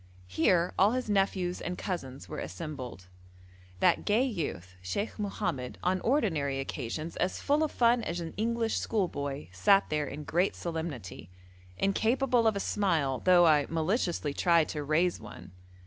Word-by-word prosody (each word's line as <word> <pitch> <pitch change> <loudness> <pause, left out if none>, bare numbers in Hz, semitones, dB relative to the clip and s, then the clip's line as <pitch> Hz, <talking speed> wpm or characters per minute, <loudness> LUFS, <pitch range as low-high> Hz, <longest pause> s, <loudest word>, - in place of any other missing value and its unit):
Here 170 - +2
all 205 +4 +5
his 250 -4 -2
nephews 190 -2 0
and 180 0 -4
cousins 135 - -5
were - - -6
assembled. 120 - -7 0.8
That - - +4
gay 220 +4 +3
youth 155 - -4
Sheikh 200 - -3
Mohammed, 140 -11 -3
on 185 +1 +1
ordinary 160 - +1
occasions 145 +4 -4
as 180 - -1
full 290 +2 +1
of 310 - 0
fun 235 0 +3
as 170 +1 -3
an 165 -1 -6
English 230 +1 0
schoolboy, 145 - -2
sat 195 - +3
there 150 -1 0
in 150 +3 -6
great 175 +6 +1
solemnity, 140 - -5 0.5
incapable 235 +4 +2
of 220 - +2
a - - -1
smile 165 -11 0
though 180 -1 +6
I 150 -3 +4
maliciously 165 - 0
tried 170 0 +3
to 150 -2 -3
raise 165 +5 +1
one. 90 +1 -11
170 Hz, 150 wpm, -30 LUFS, 140-205 Hz, 0.8 s, though